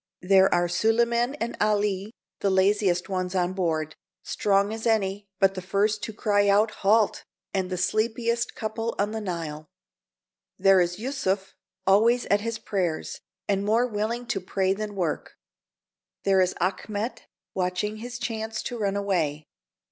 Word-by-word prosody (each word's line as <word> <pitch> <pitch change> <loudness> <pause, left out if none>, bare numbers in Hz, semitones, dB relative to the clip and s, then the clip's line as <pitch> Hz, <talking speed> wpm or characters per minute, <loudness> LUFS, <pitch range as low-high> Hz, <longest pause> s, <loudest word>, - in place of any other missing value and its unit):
There 190 +1 +5
are 175 0 +3
Sulieman 235 +7 +2
and 235 -5 -3
Ali, 205 -1 +1 0.3
the 200 - +1
laziest 190 -1 +2
ones 185 -1 -2
on 180 0 +1
board, 160 -4 -1 0.3
strong 200 +1 +1
as 225 +1 -3
any, 205 -2 0
but 195 +1 +4
the 185 - -5
first 205 +3 0
to 220 - -4
cry 205 -1 +2
out, 210 +2 +4
"Halt," 210 +2 +3 0.3
and 190 -2 -1
the 185 - -2
sleepiest 230 +5 0
couple 225 +1 -3
on 205 +1 0
the 220 0 -3
Nile. 165 -5 -5 0.9
There 195 -1 +5
is 175 0 0
Yusuf, 205 -6 -2 0.3
always 225 +5 +4
at 205 0 +4
his 230 +1 -3
prayers, 180 -8 -2 0.3
and 195 -1 +1
more 225 +4 +3
willing 230 +1 -2
to 205 -4 -2
pray 190 +1 0
than 210 0 -5
work. 175 -5 -3 0.9
There 195 -1 +4
is 185 0 +1
Achmet, 205 +5 -2 0.3
watching 185 +3 -1
his 245 +3 -6
chance 225 -2 -3
to 240 - -5
run 200 -2 0
away. 165 -7 -1
200 Hz, 150 wpm, -26 LUFS, 185-220 Hz, 0.9 s, There